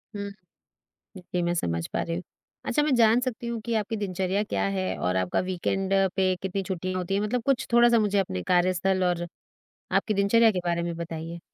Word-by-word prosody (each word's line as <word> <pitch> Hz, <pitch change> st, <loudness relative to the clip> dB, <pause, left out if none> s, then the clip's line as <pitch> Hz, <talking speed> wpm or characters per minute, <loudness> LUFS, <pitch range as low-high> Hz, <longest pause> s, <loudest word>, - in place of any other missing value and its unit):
हम्म, 200 Hz, 0 st, -4 dB, 0.9 s
जी 180 Hz, 0 st, -3 dB
मैं 175 Hz, 0 st, +1 dB
समझ 85 Hz, -, -1 dB
पा -, -, 0 dB
रही 165 Hz, -, -3 dB
हूँ। 180 Hz, -, -4 dB, 0.4 s
अच्छा, 295 Hz, -, +1 dB
मैं 295 Hz, -2 st, +2 dB
जान 230 Hz, 0 st, +5 dB
सकती 250 Hz, -2 st, -3 dB
हूँ 235 Hz, -1 st, -3 dB
कि 230 Hz, +1 st, -3 dB
आपकी 220 Hz, +1 st, -1 dB
दिनचर्या 190 Hz, -1 st, -1 dB
क्या 95 Hz, -, -1 dB
है? 95 Hz, -1 st, -1 dB
और 90 Hz, +1 st, 0 dB
आपका 95 Hz, -1 st, +1 dB
वीकेंड 190 Hz, +1 st, -1 dB, 0.2 s
पे 190 Hz, -1 st, +2 dB
कितनी 195 Hz, +1 st, -2 dB
छुट्टियाँ 185 Hz, 0 st, -3 dB
होती 185 Hz, +1 st, -2 dB
हैं। 200 Hz, -, +1 dB
मतलब 225 Hz, +4 st, -1 dB
कुछ 275 Hz, -2 st, +1 dB
थोड़ा-सा 240 Hz, 0 st, +6 dB
मुझे 205 Hz, -2 st, +1 dB
अपने 95 Hz, -, -1 dB
कार्यस्थल 185 Hz, +1 st, +2 dB
और 175 Hz, -1 st, 0 dB, 0.7 s
आपकी 215 Hz, -, +1 dB
दिनचर्या 220 Hz, +3 st, +4 dB
के 185 Hz, -, -2 dB
बारे 170 Hz, 0 st, 0 dB
में 170 Hz, 0 st, -3 dB
बताइए? 165 Hz, 0 st, -6 dB
190 Hz, 200 wpm, -26 LUFS, 175-215 Hz, 0.9 s, थोड़ा-सा